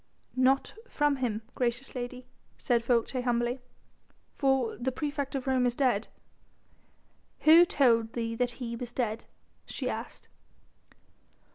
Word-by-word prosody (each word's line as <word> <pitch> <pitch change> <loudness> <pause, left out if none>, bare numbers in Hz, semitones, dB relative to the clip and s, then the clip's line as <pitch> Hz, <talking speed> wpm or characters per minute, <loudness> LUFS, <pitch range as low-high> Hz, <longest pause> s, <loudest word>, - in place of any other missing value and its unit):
"Not 260 +1 +2 0.2
from 295 -1 +1
him, 225 -4 -2
gracious 250 +1 -1
lady," 250 0 -6 0.3
said 235 -2 +1
Folces 245 +1 +1
humbly, 240 +1 0 0.8
"for 270 -4 +1
the 260 +2 -2
praefect 285 0 -3
of 265 - -3
Rome 260 -2 +2
is 240 - -1
dead." 245 -6 +1 1.3
"Who 330 +3 +8
told 230 -8 +3
thee 230 -1 -2
that 245 +1 -1
he 235 -2 -5
was 240 0 -6
dead?" 225 -3 -2 0.4
she - - -4
asked. - - -7
250 Hz, 125 wpm, -29 LUFS, 235-265 Hz, 1.3 s, Who